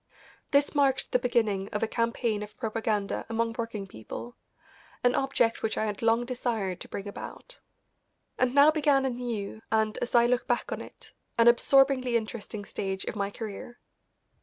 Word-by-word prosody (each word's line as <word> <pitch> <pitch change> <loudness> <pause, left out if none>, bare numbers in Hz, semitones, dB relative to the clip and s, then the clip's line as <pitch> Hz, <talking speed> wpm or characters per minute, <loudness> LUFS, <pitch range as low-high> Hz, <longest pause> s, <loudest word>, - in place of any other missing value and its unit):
This 285 0 +3
marked 275 -3 +2
the 250 - +3
beginning 215 -5 0
of 210 - -2
a - - +2
campaign 230 -2 0
of 210 0 -9
propaganda 220 -3 -1
among 230 0 0
working 225 -3 -4
people, 195 - -8 0.7
an 245 0 +4
object 250 -4 +1
which 220 - -1
I 220 - +1
had 210 -2 -4
long 230 +1 +3
desired 230 -7 -2
to - - -6
bring 200 - -6
about. - - -9 0.8
And 255 +1 +2
now 285 +2 +8
began 290 -3 +3
a 265 - +1
new 230 -4 -4
and, 220 -1 +1
as 245 - -2
I 235 0 +7
look 250 +1 +1
back 240 - 0
on - - -3
it, - - -12 0.3
an 230 0 +5
absorbingly 255 0 +5
interesting 215 -2 -6
stage 190 -1 -4
of - - -4
my 200 -1 -1
career. 220 +3 -7
230 Hz, 170 wpm, -28 LUFS, 210-250 Hz, 0.8 s, now